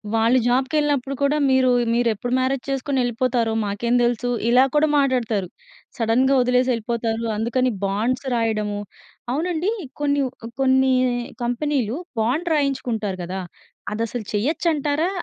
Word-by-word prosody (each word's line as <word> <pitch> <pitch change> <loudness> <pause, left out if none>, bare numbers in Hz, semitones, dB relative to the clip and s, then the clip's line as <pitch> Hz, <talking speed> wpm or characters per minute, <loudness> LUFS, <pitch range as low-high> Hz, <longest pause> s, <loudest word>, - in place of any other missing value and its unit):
వాళ్ళు 230 +3 +3
జాబ్‌కె‌ళ్ళినప్పుడు 275 +1 +1
కూడా 285 +2 +2
"మీరు 260 -1 +4 0.2
మీరు 235 0 +2
ఎప్పుడు 245 +4 -4
మ్యారేజ్ 260 0 0
చేసుకొని 270 0 -1
వెళ్ళిపోతారో? 240 -1 0
మాకేం 220 +4 -1
తెలుసు". 240 0 0 0.2
ఇలా 250 +2 +6
కూడా 305 +1 +4
మాట్లాడతారు. 235 -8 +1 0.5
సడెన్‌గా 250 +4 +2
వదిలేసి 250 +1 +2
వెళ్ళిపోతారు. 230 0 -2
అందుకని 245 +3 +1
బాండ్స్ 230 +7 -1
రాయడము 215 -3 -1 0.5
అవునండి? 345 +6 -1 0.3
కొన్ని 285 -1 +2
వ - - -5 0.3
కొన్ని 265 0 +4 0.5
కంపెనీలు 245 0 -1 0.2
బాండ్ 300 +10 0
రాయించుకుంటారు 235 -9 -1
కదా! 185 +2 -4 0.5
అదసలు 225 +1 -3
చెయ్యొచ్చు 295 +11 0
అంటారా? 300 +4 0
250 Hz, 120 wpm, -22 LUFS, 230-275 Hz, 0.5 s, ఇలా